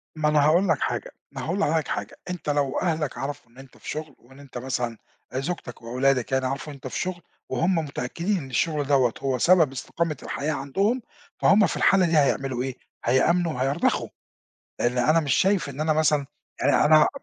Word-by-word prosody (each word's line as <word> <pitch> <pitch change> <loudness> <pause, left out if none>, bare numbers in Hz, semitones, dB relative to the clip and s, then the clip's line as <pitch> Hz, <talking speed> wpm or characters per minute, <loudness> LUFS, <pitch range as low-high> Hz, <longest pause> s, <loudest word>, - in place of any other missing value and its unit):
ما 155 -1 +1
أنا 150 -1 +4
هاقول 175 +6 +4
لك 160 -4 +2
حاجة، - - -2 0.2
ما - - -6
هاقول 175 +5 -2
لحضرتك 160 -4 +1
حاجة، - - -4
أنت 180 -4 -4
لو 145 -1 +1
أهلك 160 -5 -1
عرفوا 135 -4 -6
إن 120 - -23
أنت 135 -1 -14
في - - -10
شُغل، 155 -2 -5
وإن 135 +3 -18
أنت 135 -3 -10
مثلًا 120 -2 -3 0.4
زوجتك 135 -2 -4
وأولادك 125 +2 0
يعني 130 0 +1
عرفوا 135 +3 -3
إن - - -8
أنت 135 -1 -8
في - - -4
شُغل، 180 -1 -3 0.3
وهُم 180 +3 +1
متأكدين 165 +5 -2
إن 135 -6 -6
الشُّغل 150 +2 0
دَوّة 130 -5 +3
هو 135 -2 0
سبب 165 +1 +4
استقامة 155 +3 -3
الحياة 150 +2 -2
عندهم، 195 - 0 0.4
فهُم 205 +1 +5
في - - -3
الحالة 195 -2 +4
دي 165 -2 +2
هيعملوا 135 -3 +1
إيه، 130 -1 -4 0.3
هيأمنوا 165 +7 +2
وهيرضخوا، 135 +5 0 0.7
لإن 125 +1 0
أنا 155 +7 +4
مش 140 -4 +1
شايف 195 -4 +2
إن 140 +1 -7
أنا 155 0 +2
مثلًا 150 -2 +2 0.3
يعني - - +3
أنا 155 0 +6
145 Hz, 190 wpm, -25 LUFS, 130-165 Hz, 0.7 s, أنا